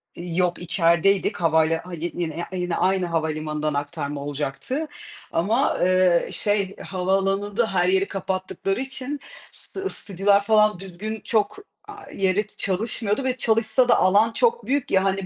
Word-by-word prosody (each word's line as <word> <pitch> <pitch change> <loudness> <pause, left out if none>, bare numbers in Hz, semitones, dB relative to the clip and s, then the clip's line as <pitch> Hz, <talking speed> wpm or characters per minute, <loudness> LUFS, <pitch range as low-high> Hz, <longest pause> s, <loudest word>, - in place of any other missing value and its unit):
yok, 175 0 -1
içerideydik. 175 +4 +2
Havala 160 -1 +2
hadi 175 -1 -5
yine, 165 -2 -3
ya 170 - -4
iii, 185 -1 -3
yine 175 -1 -1
aynı 185 -1 +2
havalimanından 155 -2 -2
aktarma 145 0 -3
olacaktı 145 - -3 0.4
ama, 220 +11 +1
eee, 185 -1 +3
şey, 205 -2 0
havaalanında 195 +3 0
her 175 -1 +2
yeri 190 +1 +2
kapattıkları 195 +3 -3
için 270 +2 -5 0.3
s - - -8
ısıtıcılar 200 - +1
falan 210 -3 +3
düzgün 200 +4 -6
çok, 215 - 0 0.3
eee, 410 0 -11
yeri 205 +3 +1
çalışmıyordu 210 +4 -2
ve 255 -1 0
çalışsa 225 +1 +2
da - - +6
alan 205 +5 +4
çok 470 - +1
büyük 280 0 -1
ya, 190 0 +4
hani, 195 0 0
190 Hz, 140 wpm, -23 LUFS, 170-215 Hz, 0.4 s, da